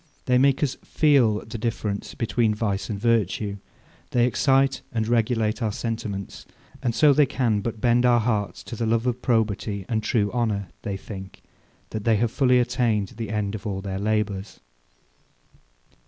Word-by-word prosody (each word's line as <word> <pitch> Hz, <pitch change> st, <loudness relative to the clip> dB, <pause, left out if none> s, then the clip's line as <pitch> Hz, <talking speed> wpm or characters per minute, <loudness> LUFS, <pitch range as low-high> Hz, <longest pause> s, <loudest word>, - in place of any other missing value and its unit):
They 125 Hz, -1 st, +3 dB
make 140 Hz, +2 st, +3 dB
us 140 Hz, -2 st, -1 dB
feel 130 Hz, -9 st, +3 dB
the 110 Hz, +1 st, -7 dB
difference 105 Hz, -3 st, -3 dB
between 115 Hz, -2 st, +1 dB
vice 105 Hz, -2 st, -2 dB
and 105 Hz, -2 st, -3 dB
virtue; 105 Hz, -2 st, 0 dB, 0.5 s
they 120 Hz, -1 st, +3 dB
excite 135 Hz, +2 st, +2 dB
and 110 Hz, -2 st, -1 dB
regulate 115 Hz, -1 st, +1 dB
our 110 Hz, -2 st, 0 dB
sentiments; 105 Hz, -3 st, -5 dB, 0.3 s
and 120 Hz, -3 st, -1 dB
so 150 Hz, -2 st, +6 dB
they 145 Hz, 0 st, +4 dB
can 115 Hz, -5 st, +1 dB
but 110 Hz, +1 st, -4 dB
bend 120 Hz, +1 st, +3 dB
our 120 Hz, -1 st, +5 dB
hearts 110 Hz, -3 st, -1 dB
to 120 Hz, -, -7 dB
the 115 Hz, 0 st, -2 dB
love 115 Hz, +1 st, +1 dB
of 125 Hz, 0 st, -1 dB
probity 105 Hz, -4 st, 0 dB
and 110 Hz, -2 st, 0 dB
true 110 Hz, -2 st, 0 dB
honour, 105 Hz, -6 st, -1 dB
they 100 Hz, -3 st, -3 dB
think, 95 Hz, -1 st, -10 dB, 0.5 s
that 110 Hz, -2 st, -4 dB
they 115 Hz, 0 st, +3 dB
have 115 Hz, +2 st, +1 dB
fully 125 Hz, -1 st, +3 dB
attained 120 Hz, -5 st, +1 dB
the 115 Hz, -3 st, -4 dB
end 105 Hz, -1 st, -2 dB
of 110 Hz, +1 st, -5 dB
all 95 Hz, -2 st, -2 dB
their 95 Hz, 0 st, -4 dB
labours. 105 Hz, -2 st, -2 dB
110 Hz, 170 wpm, -24 LUFS, 105-120 Hz, 0.5 s, so